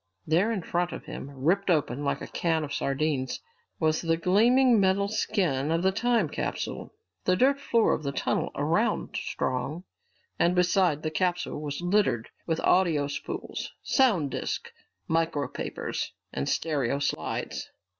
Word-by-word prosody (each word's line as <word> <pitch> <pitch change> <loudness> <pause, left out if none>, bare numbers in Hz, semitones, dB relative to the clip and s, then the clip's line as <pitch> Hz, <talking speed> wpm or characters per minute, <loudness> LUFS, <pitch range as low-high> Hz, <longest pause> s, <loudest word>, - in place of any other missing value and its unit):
There 175 +8 +2
in 200 -6 -2
front 175 +1 -1
of - - -7
him, 140 - -7
ripped 165 +9 0
open 145 -5 +1
like 140 - -1
a - - -5
can 165 -2 0
of 145 -1 -5
sardines, 140 -1 -1 0.4
was 155 -1 +2
the 165 -1 +1
gleaming 230 +7 +4
metal 195 +1 +3
skin 180 - 0
of 165 +2 +1
the 190 - +4
time 225 -2 +2
capsule! - - -4 0.3
The 185 - +4
dirt 275 +7 +3
floor 230 -5 +3
of - - -2
the 140 -2 -2
tunnel - - -1
around - - 0
Strong 140 +6 -2 0.6
and 175 +1 +3
beside 180 -4 +3
the 155 - -1
capsule 175 -2 -1
was 145 +1 -4
littered 175 - +1 0.2
with 165 -1 0
audio 170 -6 +3
spools, 140 - -5
sound 200 - +3
disks, - - -3 0.4
micropapers, 160 -4 -2 0.2
and 70 +1 -2
stereo 140 -5 0
slides. 140 0 -3
165 Hz, 145 wpm, -28 LUFS, 145-195 Hz, 0.6 s, gleaming